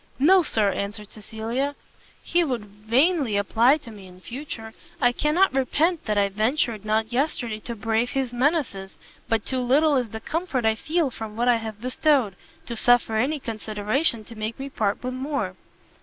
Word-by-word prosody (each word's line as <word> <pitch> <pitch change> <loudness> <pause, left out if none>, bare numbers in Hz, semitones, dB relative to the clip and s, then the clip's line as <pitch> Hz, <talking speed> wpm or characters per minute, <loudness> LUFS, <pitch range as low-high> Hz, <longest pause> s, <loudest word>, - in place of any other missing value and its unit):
"No, 360 +8 +6
Sir," 215 - +2
answered 200 +2 -5
Cecilia, 225 +6 -3 0.5
"he 350 0 +2
would 250 -8 -2
vainly 230 - +1
apply 230 +7 +4
to 275 -7 -12
me 200 -3 -12
in 180 0 -15
future: 225 0 -7 0.3
I 245 -3 +4
cannot 300 +6 +2
repent 305 +6 +1
that 210 -2 0
I 200 -1 +4
ventured 220 +1 0
not 220 +2 0
yesterday 245 -5 -1
to 235 +2 -6
brave 225 +3 0
his 265 -2 -2
menaces, 245 - 0 0.3
but 225 -2 +1
too 260 - -1
little 285 +5 +3
is 245 -3 -1
the 220 - -6
comfort 300 -3 -2
I 220 - +4
feel 305 +5 -1
from 220 -2 -7
what 240 +2 0
I 245 -1 +5
have 220 -2 -6
bestowed, 255 -4 +2 0.3
to 235 - -5
suffer 235 -1 +4
any 285 +7 +1
consideration 220 +2 -1
to 230 - -12
make 215 +1 -4
me 275 +1 -5
part 210 -2 -1
with 255 0 -3
more." 275 +3 -2
240 Hz, 175 wpm, -24 LUFS, 215-275 Hz, 0.5 s, No